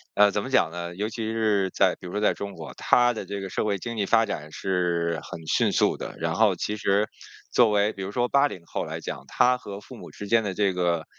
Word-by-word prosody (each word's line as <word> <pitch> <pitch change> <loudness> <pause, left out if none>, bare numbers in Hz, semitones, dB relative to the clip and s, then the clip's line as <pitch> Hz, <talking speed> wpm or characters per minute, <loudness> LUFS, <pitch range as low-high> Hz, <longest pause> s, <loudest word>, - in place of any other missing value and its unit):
呃， 105 0 +6
怎 105 - -1
么 - - -5
讲 130 -10 +3
呢？ 85 +1 -6
尤 105 +2 -1
其 115 +1 -5
是 105 -4 +1
在 - - +2
比 - - -7
如 - - -7
说 105 - -2
在 105 - +3
中 100 0 -6
国， - - -9
它 120 0 +3
的 110 - -6
这 100 - -5
个 95 -1 -5
社 - - -1
会 105 -2 0
经 115 +5 -5
济 105 -3 0
发 115 +1 +4
展 75 -7 -5
是 85 -2 0
很 80 -1 -9
迅 - - +2
速 - - +2
的。 - - -6
然 80 0 -1
后 105 -5 +3
其 105 - -2
实 105 0 +1 0.5
作 120 -3 +5
为 105 +1 +2
比 95 - -6
如 95 - -5
说 120 +3 +1
80 140 -10 +1
后 - - -3
来 - - -5
讲， - - -6
他 125 0 +3
和 100 -5 -8
父 105 - -12
母 - - -11
之 105 - -8
间 115 +2 +3
的 100 -2 -2
这 100 0 +1
个 85 -3 0
100 Hz, 275 characters per minute, -26 LUFS, 90-110 Hz, 0.5 s, 呃